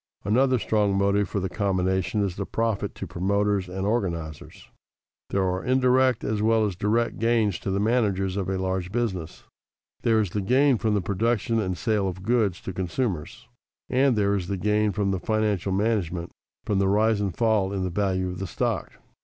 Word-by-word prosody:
Another 130 +5 +3
strong 105 -3 +1
motive 100 +1 +2
for 100 - -1
the 95 - -2
combination 95 +1 0
is 95 -3 -2
the 100 - -4
profit 110 -3 -1
to - - -6
promoters 100 +2 0
and 95 +1 -3
organizers. 85 -8 -3 0.6
There 95 - +1
are 90 0 -1
indirect 130 -1 +3
as 105 0 -1
well 110 0 +3
as 100 -3 -2
direct 115 +5 0
gains 115 -5 +1
to - - -4
the 95 +1 0
managers 100 -4 +1
of 95 -2 -2
a 95 - -1
large 95 -1 -2
business. 95 -8 -3 0.6
There 115 -1 +3
is 105 -5 -1
the 105 - -1
gain 130 +4 +3
from 105 +1 +1
the 100 - +1
production 115 +4 0
and 95 -4 -2
sale 105 -3 0
of 95 0 -5
goods 110 -5 +1
to 95 - -6
consumers, 90 - -3 0.4
and 130 0 +3
there 100 -1 +2
is 95 -3 -2
the 100 - -2
gain 105 +2 +1
from 100 -1 0
the 95 - -1
financial 105 -3 0
management, 95 -4 -1 0.3
from 100 -2 +1
the 100 - +2
rise 105 +1 +2
and 95 -5 -3
fall 110 -4 +2
in 95 -2 -2
the 90 - -2
value 95 -1 0
of 90 0 -5
stock. - - -2
100 Hz, 185 wpm, -25 LUFS, 95-110 Hz, 0.6 s, Another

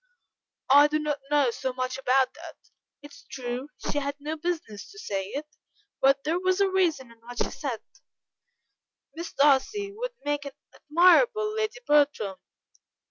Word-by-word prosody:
"I 285 +2 +8
do 300 +1 0
not 300 -1 -2
know 290 -4 +3
so 260 +2 -3
much 255 0 -3
about 260 0 +2
that: 330 +1 -11 0.5
it 290 - -11
is - - -15
true, 250 +1 -5
she 290 - -2
had 280 0 -3
no 300 +2 -4
business 320 -10 -4
to 410 - -15
say 195 - -3
it, 285 +8 -5 0.6
but 275 0 +4
there 325 +4 0
was 370 +1 +1
a 395 - +4
reason 330 -10 0
in 230 - -19
what 240 +1 -11
she - - -1
said; 260 -7 -5 1.3
Miss 335 +2 -6
Darcy 295 +9 +2
would - - -4
make 290 0 -1
an 280 - -7 0.2
admirable 425 +7 +4
Lady 440 +2 -2
Bertram. 285 - +2
290 Hz, 160 wpm, -27 LUFS, 265-350 Hz, 1.3 s, I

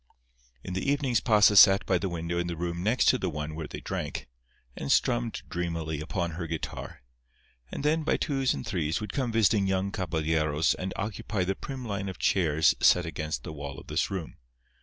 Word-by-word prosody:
In 95 - -6
the 95 +9 0
evenings 135 -6 +1
Pasa 105 -1 +5
sat 95 0 +8
by 95 -2 +2
the 95 - -2
window 85 0 -3
in 85 - -1
the 85 - -3
room 85 0 -3
next 110 +7 +2
to 130 - +3
the 95 - -1
one 75 -1 -4
where 80 -1 -5
they - - -8
drank, - - -4 0.5
and 70 - -3
strummed - - +1
dreamily 85 -3 -3
upon 85 +2 -2
her 85 +1 -5
guitar. 80 -5 -6 0.7
And - - -5
then, 155 +2 +2
by 155 - +1
twos 135 -3 0
and 65 - -6
threes, 80 -1 -1
would 105 - -6
come 130 -4 -1
visiting 105 -3 +3
young 95 +1 0
caballeros 80 -3 0
and 95 +1 -4
occupy 105 -1 -2
the 95 +2 0
prim 130 +5 -7
line 100 -2 -3
of 95 - -7
chairs 80 -4 +3
set 90 -2 +5
against 75 -1 -4
the 80 - -7
wall 70 -2 -7
of - - -14
this - - -1
room. 95 -5 -5
90 Hz, 200 wpm, -28 LUFS, 80-105 Hz, 0.7 s, sat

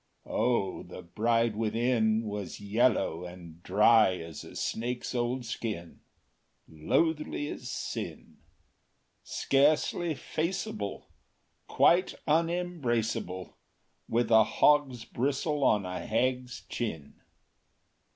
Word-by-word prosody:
O 115 -4 0
the - - -10
bride 115 +4 +1
within 115 0 +1
Was 105 -4 -5
yellow 105 -5 +1
and 90 -2 -10
dry 105 0 +5
as 80 -2 -8
a - - -12
snake’s 120 +3 -3
old 125 +1 -1
skin; 105 -7 -5 0.7
Loathly 145 - 0
as 125 - -7
sin! - - -5 0.9
Scarcely 155 +4 +2
faceable, 155 - -3 0.6
Quite 175 +2 +3
unembraceable; 150 - -1 0.5
With 120 +1 +1
a 110 -1 +8
hog’s 135 -1 +2
bristle 140 +3 -1
on 105 -6 +3
a 90 0 -4
hag’s 125 +1 -1
chin! 80 -12 -5
115 Hz, 95 wpm, -29 LUFS, 105-135 Hz, 0.9 s, a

